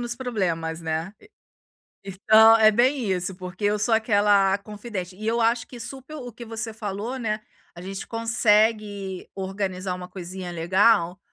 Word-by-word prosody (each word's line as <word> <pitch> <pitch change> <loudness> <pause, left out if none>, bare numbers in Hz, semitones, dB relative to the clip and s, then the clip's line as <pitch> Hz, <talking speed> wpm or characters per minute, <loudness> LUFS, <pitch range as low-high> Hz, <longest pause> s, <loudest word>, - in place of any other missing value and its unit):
nos 240 0 -3
problemas, 170 -10 -2
né. 160 +4 -3
E 420 - -19 0.8
então, 220 +4 +6
é 220 -1 +6
bem 245 -1 +2
isso, 180 0 -2
porque 185 +2 -6
eu 210 +1 +2
sou 220 +2 +1
aquela 205 -3 +3
a - - +2
confidente. 205 -3 -7
E 215 +2 -5
eu 235 +1 +1
acho 230 +1 +1
que 245 - -11
super 265 +6 -7
o 245 -4 -7
que 240 +2 -10
você 225 0 -4
falou, 215 +3 -5
né, 215 -2 -2 0.3
a 175 - -10
gente 195 +1 -7
consegue 215 -4 +1
organizar 190 -1 -3
uma 180 0 -7
coisinha 180 0 -7
legal, 180 +2 +2
205 Hz, 165 wpm, -24 LUFS, 185-225 Hz, 0.8 s, então